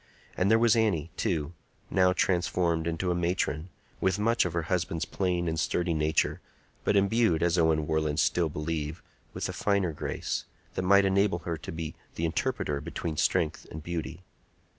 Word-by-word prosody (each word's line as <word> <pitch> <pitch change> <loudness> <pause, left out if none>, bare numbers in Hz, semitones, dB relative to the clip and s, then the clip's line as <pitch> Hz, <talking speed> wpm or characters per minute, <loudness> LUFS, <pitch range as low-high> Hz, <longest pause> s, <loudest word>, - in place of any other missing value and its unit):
And 95 - +2
there 110 - +6
was 115 -1 +4
Annie, 95 -8 +1
too, 80 -2 -1 0.4
now 95 -1 +4
transformed 85 -3 +1
into 85 +2 -1
a - - +2
matron, 85 -1 -1 0.3
with 95 0 +1
much 115 +1 +2
of 90 - -2
her 85 -1 0
husband's 85 -2 -1
plain 90 -2 -1
and 80 0 -1
sturdy 85 +2 0
nature, 75 0 +1 0.4
but - - +2
imbued, 100 -4 +3
as 85 0 +3
Owen 80 -2 +3
Warland 80 -1 0
still 85 -3 +2
believed, 75 +1 -3 0.3
with - - -2
a - - -5
finer 100 -4 +1
grace, - - -3 0.3
that - - -2
might 100 +2 +5
enable 95 -1 +2
her 85 - -1
to 75 - -8
be 80 -1 -5 0.2
the 85 - -1
interpreter 85 - -1
between 80 +2 -4
strength 75 0 0
and 80 0 -8
beauty. 85 +1 -5
85 Hz, 170 wpm, -28 LUFS, 80-95 Hz, 0.4 s, there